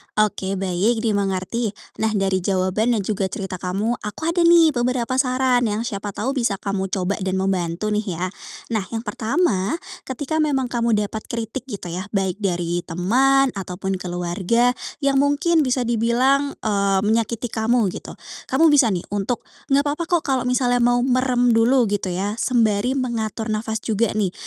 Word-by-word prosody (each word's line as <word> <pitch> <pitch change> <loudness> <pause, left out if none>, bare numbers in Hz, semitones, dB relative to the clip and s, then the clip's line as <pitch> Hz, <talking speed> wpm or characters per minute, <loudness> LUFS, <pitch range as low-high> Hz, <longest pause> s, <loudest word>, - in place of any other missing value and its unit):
Oke, 195 -2 0
baik, 195 +5 0
dimengerti. 200 +1 -1 0.2
Nah, 220 - +2
dari 195 -1 +1
jawaban 190 +5 +1
dan 210 - -1
juga 195 -1 -1
cerita 190 -1 -5
kamu, 200 +7 -1
aku 210 +6 -7
ada 335 +1 +2
nih 335 -2 +6
beberapa 245 -1 -1
saran 255 -2 +2
yang 215 +2 -1
siapa 205 -3 -5
tahu 235 +6 -1
bisa 235 -7 0
kamu 195 -1 -3
coba 190 +1 -2
dan 190 -1 -1
membantu 190 +1 -1
nih 210 -4 -1
ya. 175 +3 -2 0.5
Nah, 220 - +1 0.2
yang 225 - -3
pertama, 220 - 0 0.3
ketika 285 +4 -2
memang 270 -5 0
kamu 235 -2 +1
dapat 210 +1 -2
kritik, 230 +2 -5
gitu 200 -7 -6
ya, 185 +4 -5
baik 195 0 0
dari 175 -3 -1
teman 260 +10 +3
ataupun 190 0 -4
keluarga, 180 +7 0 0.3
yang 275 -1 +3
mungkin 290 +4 +2
bisa 255 -3 +1
dibilang, 245 +5 +1
eee, 200 -2 +2
menyakiti 225 +2 0
kamu, 220 -2 +1
gitu. - - -8 0.3
Kamu 325 -1 +4
bisa 280 -5 +5
nih 175 - -3
untuk 205 +4 -2 0.2
enggak 280 +1 +3
papa 295 +3 -2
kok 345 -3 +1
kalau 260 -3 0
misalnya 250 -1 +2
mau 245 0 +3
merem 250 -1 +2
dulu, 235 +3 +4
gitu 205 -2 -1
ya, 195 +5 -2
sembari 235 0 +2
mengatur 230 -3 -2
nafas 220 +1 -2
juga 220 -1 0
nih. 205 -4 +1
220 Hz, 165 wpm, -22 LUFS, 195-250 Hz, 0.5 s, nih